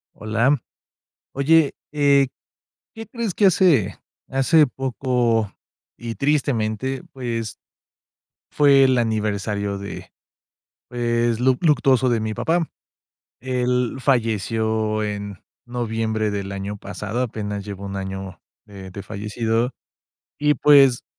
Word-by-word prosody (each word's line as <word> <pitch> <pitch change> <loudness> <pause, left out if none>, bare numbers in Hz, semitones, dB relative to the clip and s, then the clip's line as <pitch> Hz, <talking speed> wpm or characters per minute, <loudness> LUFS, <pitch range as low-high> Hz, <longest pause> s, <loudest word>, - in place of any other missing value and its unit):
Hola. 115 +7 +1 0.8
Oye, 150 +2 +3 0.2
eh, 140 -2 +4 0.7
¿qué 225 -2 -8
crees?, 230 -5 -3
que 205 - +2
hace 155 - +4 0.3
hace 135 +4 +4
poco 125 -4 0 0.5
y, 115 -1 -6
tristemente, 130 -3 0
pues, 115 -4 -4 0.9
fue 140 -2 +5
el 130 -1 +3
aniversario 105 -3 -1
de, 100 0 -8 0.8
pues, 120 -1 0
luc 130 +1 +2
luctuoso 135 -5 +3
de 120 -2 +1
mi 110 0 -2
papá. 165 +6 0 0.7
Él 125 -1 0
falleció 110 -3 0
en 100 -2 -5 0.3
noviembre 110 -3 -2
del 100 -1 -4
año 100 +1 -5
pasado, 105 +4 -4
apenas 105 -4 -4
lleva 100 -1 -7
1 100 0 -5
año 95 -1 -6 0.3
de 100 -3 -10
de 100 +1 -8
fallecido, 110 +4 -2 0.7
y, 150 0 +3
pues, 140 -5 +5
115 Hz, 110 wpm, -22 LUFS, 105-135 Hz, 0.9 s, fue